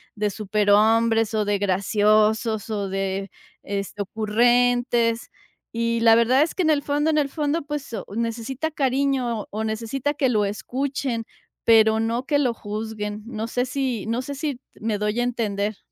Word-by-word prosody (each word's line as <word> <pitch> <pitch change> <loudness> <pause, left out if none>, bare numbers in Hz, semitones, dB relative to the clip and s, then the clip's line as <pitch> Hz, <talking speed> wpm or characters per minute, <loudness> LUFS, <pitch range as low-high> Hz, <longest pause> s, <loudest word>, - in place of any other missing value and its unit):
de 210 -1 0
superhombres 215 +2 +2
o 215 -1 +1
de 205 0 +1
graciosos, 210 +3 +2
o 205 -3 -2
de 195 0 -3 0.3
es 200 -1 -4
ocurrentes, 235 +3 +1 0.4
y 230 0 0
la 225 -1 +7
verdad 235 +4 +4
es 315 - -3
que 370 - 0
en 315 - +2
el 290 -2 +2
fondo 295 +2 +1
en 305 - +1
el 285 -1 0
fondo, 300 +2 -1
pues, 290 -3 -5
oh, - - -4
necesita 235 +6 -2
cariño 265 -5 0
o 215 +2 -3
necesita 230 +6 -2
que 270 -2 +1
lo 215 -4 +2
escuchen, 250 +3 -3 0.4
pero 220 -1 +5
no 230 +3 -1
que 290 +1 +2
lo 255 -4 +1
juzguen, 210 -1 -5
no 225 -2 -4
sé 245 +2 -1
si 255 -4 -2
no 230 +2 -1
sé 285 - -5
si 285 -3 -3 0.2
me 215 -1 -1
doy 210 +2 -1
a - - +2
entender. 215 -4 -2
230 Hz, 165 wpm, -23 LUFS, 210-255 Hz, 0.4 s, la